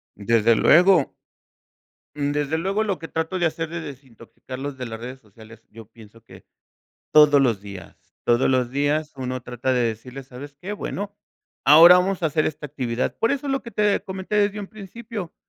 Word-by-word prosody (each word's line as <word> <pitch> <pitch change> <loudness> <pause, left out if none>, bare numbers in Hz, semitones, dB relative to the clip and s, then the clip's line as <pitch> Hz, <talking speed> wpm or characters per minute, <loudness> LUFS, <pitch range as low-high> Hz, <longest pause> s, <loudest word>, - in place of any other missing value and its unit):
Desde 115 +2 +2
luego. 175 +1 +4 1.0
Desde 145 +1 -1
luego, 195 +5 -1
lo 195 -4 -2
que 165 - -8
trato 160 +3 -3
de 175 - +1
hacer 160 0 -2
de 170 0 -5
desintoxicarlos 135 -1 -9
de 125 - -5
las 115 -1 -7
redes 125 +2 -9
sociales, 110 +1 -17
yo 115 -1 -13
pienso 115 0 -17
que - - -16 0.7
todos 150 -2 +6
los 115 -6 +1
días, 100 -4 -13
todos 120 +2 +2
los 125 -2 +1
días 145 +3 -1
uno 130 -1 -4
trata 125 +2 -3
de 125 - +1
decirles: 125 +4 -5
"¿Sabes 140 +3 -10
qué? 205 +3 -6
Bueno, 205 0 -5 0.5
ahora 165 +5 +9
vamos 185 0 -1
a - - +3
hacer 155 0 0
esta 150 0 -5
actividad". 125 -4 -3
Por 230 +4 +1
eso 280 0 -3
lo 270 0 0
que 235 - -10
te 210 -1 +1
comenté 190 +2 -4
desde 205 0 +1
un 195 - -8
principio. 215 -2 -8
145 Hz, 180 wpm, -23 LUFS, 125-185 Hz, 1.0 s, ahora